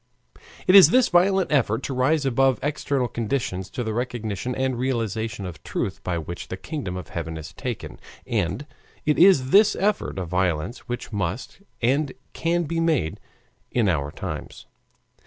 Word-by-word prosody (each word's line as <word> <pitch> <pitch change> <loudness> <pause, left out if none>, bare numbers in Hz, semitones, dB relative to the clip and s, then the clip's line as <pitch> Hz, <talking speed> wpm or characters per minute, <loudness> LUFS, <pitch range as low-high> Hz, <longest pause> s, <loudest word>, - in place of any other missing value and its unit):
It 185 - +4
is 195 -2 +10
this 255 0 +4
violent 190 +1 +3
effort 115 -6 +2
to 135 - -3
rise 140 +4 +2
above 135 0 +3
external 140 -3 0
conditions 110 -5 -2
to 125 - -4
the 110 -1 -2
recognition 120 -1 -3
and 130 -1 0
realization 115 -5 -2
of 85 -4 -8
truth - - -3
by 90 -2 -1
which 85 +2 -6
the 95 - -5
kingdom 115 - -5
of 90 - -8
heaven 80 -1 -4
is 80 0 -8
taken, - - -5 0.3
and 100 - -1 0.4
it 150 - +2
is 165 -8 +6
this 210 +2 +6
effort 200 - 0
of 95 -2 -3
violence 90 - -1
which 120 -1 -5
must 100 - -3 0.2
and 135 +3 +2 0.2
can 170 +1 0
be 165 +1 -2
made 135 - +1 0.5
in 120 -4 +1
our 70 -6 0
times. - - -7
120 Hz, 160 wpm, -24 LUFS, 95-150 Hz, 0.5 s, is